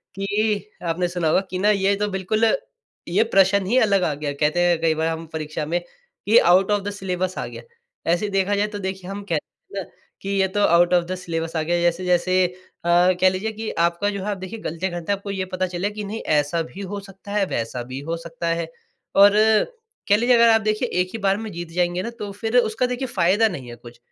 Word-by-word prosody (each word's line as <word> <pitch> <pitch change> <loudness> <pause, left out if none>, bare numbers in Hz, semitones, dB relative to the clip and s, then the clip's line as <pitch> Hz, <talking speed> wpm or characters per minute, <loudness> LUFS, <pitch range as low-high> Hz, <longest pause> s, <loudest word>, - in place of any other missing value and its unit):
कि 205 +1 -1 0.2
आपने 175 +2 0
सुना 175 -2 -2
होगा 160 +4 +3
कि 185 - -3
ना 205 +2 +3
ये 200 -1 +2
तो - - +1
बिल्कुल 200 +3 0 0.6
ये 190 +6 +3
प्रश्न 195 -2 +3
ही 230 +7 +1
अलग 200 -6 +3
आ 155 - +1
गया। 145 0 -3
कहते 150 +4 +1
हैं 175 -2 +2
कई 165 -1 +3
बार 160 +1 0
हम 165 0 -3
परीक्षा 155 -1 -4
में 170 +3 0 0.5
कि 220 +3 +5
आउट 185 +3 +5
ऑफ 205 -1 +2
द 205 - -3
सिलेबस 185 -2 -3
आ - - -2
गया। - - -9 0.5
ऐसे 190 +5 0
देखा 195 +1 +1
जाए 205 +1 +1
तो 210 -1 -6
देखिए 190 -1 -5
हम 200 +1 -5
कहते 160 -3 -1 0.3
हैं - - -3
ना - - -22 0.3
कि 195 - -5
ये 195 -1 +2
तो 190 +2 -3
आउट 175 +1 +4
ऑफ 175 -1 +4
द 185 +2 -3
सिलेबस 165 -2 -4
आ 160 - +1
गया 175 +2 0
जैसे-जैसे 180 +1 +2 0.4
अ, - - -1 0.3
कह 185 - +7
लीजिए 190 +4 -3
कि 220 0 -5
आपका 170 +4 +1
जो 200 -1 -4
है 210 - -3
आप 200 - -3
देखिए 190 +4 -7
गलतियाँ 170 +4 -3
करते 175 +2 -3
हैं 200 - +1
आपको 200 +1 -6
ये 190 -1 -2
पता 185 0 0
चले 180 +3 -2
कि 210 0 -6
नहीं 210 +3 -5
ऐसा 150 +3 +1
भी 180 +4 -10
हो 205 0 -4
सकता 195 0 -12
है, 205 -1 +2
वैसा 120 -5 -3
भी 130 +2 -7
हो 165 - -1
सकता 165 0 -6
है 165 0 -1 0.5
और 200 +1 +8 0.8
कह 205 - +6
लीजिए 240 +3 +4
अगर 235 0 +6
आप 225 0 +5
देखिए 215 +3 0
एक 180 - -2
ही - - -3
बार 195 -1 +2
में 220 0 -6
जीत 170 -1 -6
जाएँगे, 175 +1 0
ना 235 - -3
तो 210 -4 -7
फ़िर 225 +4 -1
उसका 225 0 +2
देखिए 250 +1 -2
फ़ायदा 200 +1 +3
नहीं 135 - -6
है 120 - -8
कुछ। 120 0 -14
190 Hz, 240 wpm, -22 LUFS, 170-205 Hz, 0.8 s, और